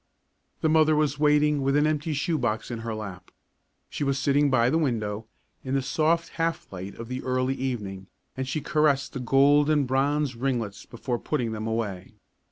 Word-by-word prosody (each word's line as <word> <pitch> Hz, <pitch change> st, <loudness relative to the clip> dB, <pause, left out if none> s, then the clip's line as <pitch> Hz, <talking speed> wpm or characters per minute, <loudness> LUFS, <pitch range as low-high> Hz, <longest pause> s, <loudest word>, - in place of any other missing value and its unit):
The -, -, +2 dB
mother 155 Hz, 0 st, +4 dB
was 150 Hz, -2 st, +1 dB
waiting 150 Hz, -1 st, +3 dB
with 135 Hz, +1 st, +1 dB
an 150 Hz, +1 st, +4 dB
empty 155 Hz, +1 st, 0 dB
shoe 150 Hz, +2 st, 0 dB
box 115 Hz, -1 st, -2 dB
in 115 Hz, -, -4 dB
her 115 Hz, -1 st, -4 dB
lap. 95 Hz, -5 st, -8 dB, 0.6 s
She -, -, -4 dB
was 140 Hz, -1 st, +1 dB
sitting 145 Hz, +1 st, +2 dB
by 125 Hz, -2 st, +3 dB
the 160 Hz, -, +2 dB
window, 110 Hz, -7 st, -2 dB, 0.4 s
in 130 Hz, +1 st, -2 dB
the 135 Hz, -, +1 dB
soft 165 Hz, +4 st, +1 dB
half 165 Hz, 0 st, 0 dB
light 95 Hz, +2 st, -7 dB
of 115 Hz, -, -8 dB
the 125 Hz, +1 st, -4 dB
early 130 Hz, 0 st, 0 dB
evening, 105 Hz, -8 st, -4 dB, 0.3 s
and 130 Hz, 0 st, -3 dB
she 150 Hz, +3 st, -2 dB
caressed 145 Hz, -1 st, +1 dB
the 135 Hz, -, -4 dB
golden 145 Hz, +3 st, +4 dB
bronze 135 Hz, +1 st, +1 dB
ringlets 120 Hz, -5 st, -3 dB
before 120 Hz, 0 st, -4 dB
putting 125 Hz, -7 st, -2 dB
them 110 Hz, 0 st, -4 dB
away. 105 Hz, -3 st, -3 dB
135 Hz, 180 wpm, -26 LUFS, 115-150 Hz, 0.6 s, mother